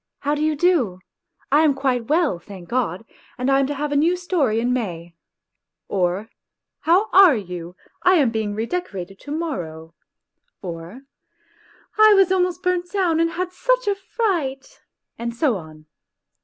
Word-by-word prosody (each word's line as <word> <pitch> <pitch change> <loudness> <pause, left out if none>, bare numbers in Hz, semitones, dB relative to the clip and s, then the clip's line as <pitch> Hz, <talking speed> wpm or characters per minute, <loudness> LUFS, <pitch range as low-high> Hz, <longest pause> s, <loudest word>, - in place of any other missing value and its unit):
How 290 +1 0
do 300 - -2
you 310 0 +1
do? 290 - +2 0.5
I 295 +2 +5
am 300 -3 +3
quite 255 -4 -1
well, 305 - +1
thank 185 -1 -12
God, 225 -5 -2 0.3
and 255 +2 0
I 270 - +4
am 275 - +1
to 290 - -3
have 295 +1 -3
a - - 0
new 330 +5 +3
storey 315 - 0
in 245 +2 0
May," 175 -8 -4 0.7
or, 185 +2 -1 0.3
" - - -63
How 370 +6 +4
are 370 -6 +7
you? 180 -4 -6 0.3
I 370 +1 +5
am 280 -9 +3
being 215 -2 -2
redecorated 210 - -4
to 290 - -10
morrow"; 165 - -5 0.7
or, 175 +6 -8 1.0
"I 430 -1 +8
was 385 -2 +4
almost 365 -1 0
burnt 360 -1 0
down 360 -5 +1
and 330 0 +2
had 360 0 -3
such - - +1
a 405 - +3
fright," 360 - -3 0.4
and 235 0 -4
so 260 -2 +1
on. 155 -3 -10
275 Hz, 165 wpm, -22 LUFS, -, 1.0 s, I